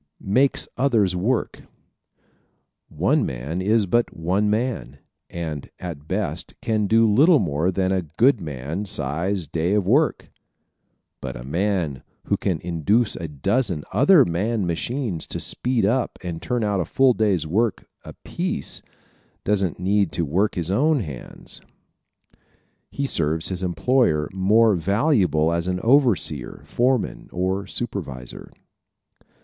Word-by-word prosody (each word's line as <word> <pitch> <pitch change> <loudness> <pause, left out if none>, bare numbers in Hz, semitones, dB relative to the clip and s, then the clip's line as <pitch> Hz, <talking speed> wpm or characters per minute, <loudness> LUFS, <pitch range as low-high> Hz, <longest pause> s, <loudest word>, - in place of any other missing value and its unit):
Makes 135 +4 +3
Others 115 -8 +2
Work 110 +7 -1
¶ - - -24 1.2
One - - +1
man 70 +9 -4
is 105 +2 +2
but 120 +5 0
one 95 +6 +1
man 110 - -2 0.3
and 80 -4 -5
at 80 -5 -8
best - - -3
can 110 -2 0
do 115 +2 +4
little 150 - +5
more 80 - 0
than 95 0 0
a 95 -1 +1
good 115 - +2
man 75 +5 -5
size 85 +1 -1
day 85 +6 -1
of 105 -3 +1
work. 145 - +1 0.9
But - - -5
a - - -8
man 85 -1 -1 0.2
who - - 0
can 90 -5 -1
induce 90 +7 +1
a 85 - -5
dozen 90 - -1
other 145 +2 +6
man 100 +5 -1
machines 95 - -3
to - - -4
speed 125 -4 0
up 120 +4 0
and 85 -2 -5
turn 125 -2 -1
out 100 -2 0
a - - -2
full 130 +8 +3
day's 100 -8 +1
work 105 +7 0 0.2
apiece - - -4 0.6
doesn't 100 -4 0
need 100 0 +1
to 85 - -1
work 95 +9 0
his 85 -1 -2
own 145 +6 +2
hands. 70 - -9 1.3
He 140 - -3
serves 80 - 0
his 95 -1 -2
employer 90 - +1
more 105 +4 +4
valuably 90 - +2
as 85 +1 -2
an 90 0 -1
overseer, 125 -4 +1
foreman 125 0 0
or 95 +2 -2
supervisor. 75 - -6
95 Hz, 135 wpm, -23 LUFS, 85-115 Hz, 1.3 s, other